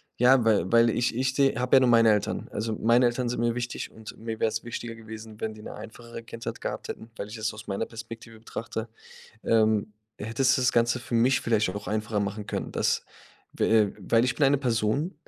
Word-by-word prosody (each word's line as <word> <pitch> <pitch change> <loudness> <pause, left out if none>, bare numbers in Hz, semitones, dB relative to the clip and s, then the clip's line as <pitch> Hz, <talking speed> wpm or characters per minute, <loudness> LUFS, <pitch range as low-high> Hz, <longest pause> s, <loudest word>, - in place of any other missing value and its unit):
ja, 125 0 +5
weil 100 -5 +2
weil 115 0 +6
ich 120 +1 0
ich 130 +2 0 0.2
habe 125 +1 +3
ja - - +9
nur 130 - +4
meine 115 -1 +6
Eltern. 105 - -2
Also, 110 +1 -2
meine 120 +2 +4
Eltern 120 +1 -1
sind 120 -1 -2
mir 120 0 +1
wichtig 120 0 -4
und 110 -1 -11
mir 110 -1 -5
wäre - - +3
es 110 +1 -4
wichtiger 115 0 -6
gewesen, 110 -1 -10
wenn 110 - -2
die 110 - -12
'ne - - -7
einfachere 115 0 -10
Kindheit 115 0 -7
gehabt - - -4
hätten, 115 +1 -8
weil 100 - -5
ich 105 +2 -8
es 110 -1 -2
aus 110 0 -11
meiner 100 +2 -2
Perspektive 115 0 -10
betrachte, 115 0 -5 0.6
ähm, 110 -2 +2 0.3
hätte 115 +5 -3
es 135 +2 +5
das 125 -2 +2
Ganze 120 +1 +2
für 120 0 -6
mich 125 +2 +3
vielleicht 110 -4 +1
auch 105 - -7
einfacher 105 0 -1
machen 100 +1 -3
können, - - -3
dass, - - 0 0.5
w - - -1
äh, 110 -3 +4
weil 115 +5 +3
ich 130 - 0
bin 150 - +2
eine 140 +1 +4
Person, 125 - 0
115 Hz, 220 wpm, -27 LUFS, 110-120 Hz, 0.6 s, ja